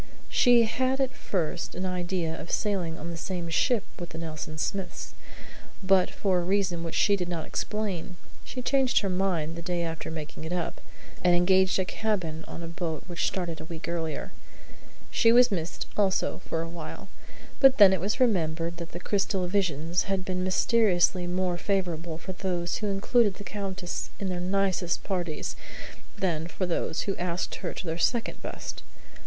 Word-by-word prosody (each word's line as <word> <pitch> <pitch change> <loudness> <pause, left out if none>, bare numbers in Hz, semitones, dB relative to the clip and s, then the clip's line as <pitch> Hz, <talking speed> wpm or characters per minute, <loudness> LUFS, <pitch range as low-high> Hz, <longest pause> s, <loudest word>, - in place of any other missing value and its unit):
She 245 -2 +6
had 260 +4 +1
at 265 -1 +2
first 170 -2 -2
an 185 +2 -2
idea 180 -2 -1
of 165 - -7
sailing 185 -6 0
on 170 +3 -5
the 170 - -5
same 175 0 -3
ship 225 +6 +2 0.2
with 175 -1 -5
the - - -8
Nelson 155 -2 -5
Smiths; 190 +3 -3 0.7
but 190 -1 +4
for 190 -3 +1
a - - -1
reason 185 -2 +1
which 165 - -4
she 205 - +4
did 180 -3 -3
not 165 -3 -2
explain, 195 -4 -3 0.3
she 250 - -6
changed 265 0 +3
her 200 - -1
mind 180 -4 0
the 170 - -5
day 175 0 -1
after 165 -1 -4
making 155 -1 -6
it 160 - -5
up, 175 -2 -2 0.4
and 175 -1 +6
engaged 190 +2 +4
a 190 - +1
cabin 180 -8 -2
on 170 - -7
a - - -4
boat 165 -2 -3
which 175 -2 -1
started 175 -4 -3
a - - -7
week 165 0 -6
earlier. 165 -2 -3 0.8
She 230 - +5
was 245 0 +7
missed, 170 -3 -2
also, 195 -2 +1
for 165 0 -1
a - - -5
while. 170 +4 -7 0.5
But 270 -1 +7
then 200 -3 +9
it 185 - 0
was 205 +7 0
remembered 170 -7 +1
that 170 0 -7
the 175 - -4
crystal 190 -1 0
visions 175 -3 +1
had 195 -2 -1
been 185 -1 -1
mysteriously 185 -2 +3
more 180 0 0
favourable 175 -5 -1
for 185 +3 -6
those 180 -2 -1
who 210 - -2
included 205 +1 +3
the 200 - -9
Countess 190 -2 -4
in 195 - -2
their 180 -1 -2
nicest 185 -1 0
parties 175 -6 -2 0.6
than 165 -4 0
for 180 +3 -2
those 170 -2 -1
who 195 - -1
asked 175 0 -2
her - - -2
to - - -5
their 165 0 -2
second 235 +6 +1
best. - - -6
180 Hz, 180 wpm, -28 LUFS, 170-195 Hz, 0.8 s, then